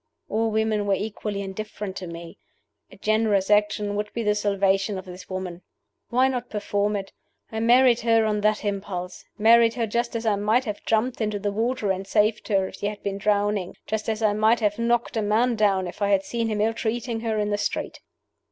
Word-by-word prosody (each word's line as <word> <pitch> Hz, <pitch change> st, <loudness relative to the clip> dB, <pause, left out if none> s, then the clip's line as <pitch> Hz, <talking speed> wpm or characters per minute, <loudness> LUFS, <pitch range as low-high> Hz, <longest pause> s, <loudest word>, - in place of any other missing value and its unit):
All 225 Hz, +1 st, +1 dB
women 220 Hz, -1 st, 0 dB
were 200 Hz, -, +3 dB
equally 205 Hz, 0 st, -4 dB
indifferent 195 Hz, 0 st, -6 dB
to 185 Hz, -, -6 dB
me. 170 Hz, 0 st, -9 dB, 0.5 s
A -, -, -14 dB
generous 215 Hz, -2 st, +1 dB
action 210 Hz, 0 st, +2 dB
would 210 Hz, 0 st, -3 dB
be 235 Hz, -, -2 dB
the 210 Hz, -1 st, +3 dB
salvation 200 Hz, -1 st, +1 dB
of 185 Hz, -, -7 dB
this 180 Hz, 0 st, -11 dB
woman. 185 Hz, -2 st, -5 dB, 0.5 s
Why 255 Hz, +2 st, +3 dB
not 250 Hz, -2 st, -3 dB
perform 205 Hz, 0 st, -1 dB
it? 195 Hz, -1 st, -4 dB, 0.4 s
I 220 Hz, -, -3 dB
married 240 Hz, +1 st, +5 dB
her 225 Hz, -1 st, +3 dB
on 210 Hz, -1 st, 0 dB
that 215 Hz, 0 st, +1 dB
impulse 195 Hz, -3 st, -4 dB
married 230 Hz, +1 st, +5 dB
her 235 Hz, -2 st, 0 dB
just 235 Hz, +2 st, -2 dB
as 230 Hz, 0 st, -3 dB
I 210 Hz, -2 st, +2 dB
might 220 Hz, +6 st, +2 dB
have 210 Hz, -2 st, -5 dB
jumped 230 Hz, +3 st, +1 dB
into 210 Hz, -1 st, 0 dB
the 205 Hz, 0 st, -2 dB
water 225 Hz, 0 st, 0 dB
and 190 Hz, +1 st, -3 dB
saved 210 Hz, +2 st, +1 dB
her 195 Hz, -3 st, +1 dB
if -, -, -11 dB
she 205 Hz, -, -2 dB
had 205 Hz, 0 st, -6 dB
been 200 Hz, 0 st, -3 dB
drowning; 205 Hz, -2 st, 0 dB
just 220 Hz, 0 st, -2 dB
as 220 Hz, 0 st, -2 dB
I 210 Hz, -1 st, +3 dB
might 220 Hz, +3 st, +3 dB
have 210 Hz, -1 st, 0 dB
knocked 235 Hz, 0 st, 0 dB
a -, -, +2 dB
man 225 Hz, +4 st, +2 dB
down 200 Hz, -3 st, +2 dB
if 175 Hz, -, -10 dB
I 200 Hz, -, +2 dB
had 195 Hz, -1 st, +3 dB
seen 230 Hz, +1 st, -2 dB
him 215 Hz, -2 st, -1 dB
ill 225 Hz, +1 st, +2 dB
treating 230 Hz, +1 st, -2 dB
her 225 Hz, -1 st, -2 dB
in 210 Hz, 0 st, 0 dB
the 205 Hz, -, +1 dB
street! -, -, -3 dB
210 Hz, 215 wpm, -24 LUFS, 200-225 Hz, 0.5 s, married